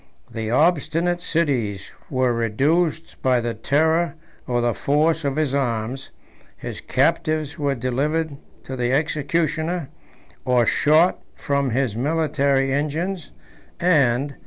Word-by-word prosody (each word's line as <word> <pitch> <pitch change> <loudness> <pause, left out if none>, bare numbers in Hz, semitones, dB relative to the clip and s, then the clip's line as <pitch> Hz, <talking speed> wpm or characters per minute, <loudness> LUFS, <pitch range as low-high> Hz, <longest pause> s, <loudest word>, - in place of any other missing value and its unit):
The 110 -1 -4
obstinate 170 +5 +1
cities 125 - -1 0.2
were 130 -3 +1
reduced 145 +9 0
by 130 -2 +3
the 120 0 -2
terror 160 +9 +1 0.3
or 120 -2 0
the 120 -1 +1
force 155 +6 +1
of 140 -1 -1
his 155 -3 0
arms: 125 -1 -2 0.5
his - - -7
captives 155 -2 0
were 140 -2 0
delivered 140 +5 -1 0.3
to 130 - -6
the 125 -1 -1
executioner, 155 +2 -1 0.5
or 125 -2 +3
shot 155 - +3
from 140 -1 -1
his 125 -2 0
military 140 -1 +1
engines; 160 +6 -2 0.5
and. 140 -5 +2
140 Hz, 115 wpm, -22 LUFS, 125-160 Hz, 0.5 s, by